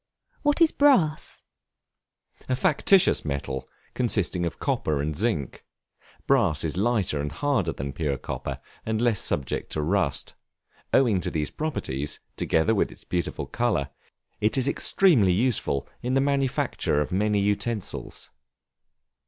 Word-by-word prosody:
What 295 +2 +1
is 320 - +4
Brass? 190 - +2 1.1
A 130 - +2
factitious 170 +8 +4
metal, 70 -2 -4 0.3
consisting 100 -7 0
of 85 - -6
copper 75 -2 -1
and 75 +2 -2
zinc. 95 - -2 0.6
Brass 75 -1 +3
is 80 0 -1
lighter 100 -7 +1
and 75 0 -3
harder 100 - 0
than 70 -2 -5
pure 70 -1 -1
copper, 65 - -5 0.3
and 110 -1 -1
less 115 -3 +2
subject 65 -3 -2
to 75 - -1
rust; 85 -4 0 0.6
owing 115 -8 +3
to - - -1
these 75 -2 -2
properties, 75 - -3 0.2
together 80 +8 +2
with 105 - +1
its - - -14
beautiful 90 -2 -3
color, 105 - -1 0.5
it 105 +5 +1
is 130 0 +1
extremely 140 - +3
useful 100 - +1
in 125 +2 -1
the - - +4
manufacture 135 - 0
of 75 - -2
many 105 +3 +1
utensils. 105 +1 -3
100 Hz, 135 wpm, -26 LUFS, 75-125 Hz, 1.1 s, is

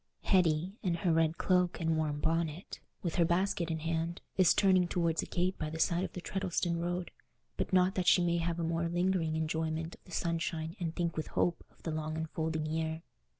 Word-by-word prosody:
Hetty, 180 +1 +2
in 180 -5 0
her 170 0 +1
red 160 0 +2
cloak 180 -1 +2
and 165 -1 +1
warm 150 -2 -1
bonnet, 165 +2 -1 0.2
with 170 -3 -2
her 175 - +5
basket 175 0 +1
in 160 - -1
her 155 - -9
hand, 165 +1 -1 0.2
is 185 -2 +5
turning 185 -3 +4
towards 170 -2 +1
a - - -6
gate 180 +1 -1
by 155 - -2
the 160 - -5
side 170 +2 +2
of - - -4
the 180 - -6
Treddleston 175 -2 -1
road, 175 +1 -2 0.4
but - - -2
not 185 0 +4
that 185 -3 -1
she 180 - +6
may 170 0 +2
have 170 0 -1
a - - -1
more 165 +1 0
lingering 175 -2 +1
enjoyment 160 +1 -2
of - - -16
the 180 - -15
sunshine 165 -1 -2
and 165 -2 -3
think 170 -2 -1
with 155 - -3
hope 175 - 0
of - - -27
the 165 - -2
long 155 0 -3
unfolding 160 0 -2
year. 160 +1 -2
170 Hz, 215 wpm, -32 LUFS, 160-180 Hz, 0.4 s, she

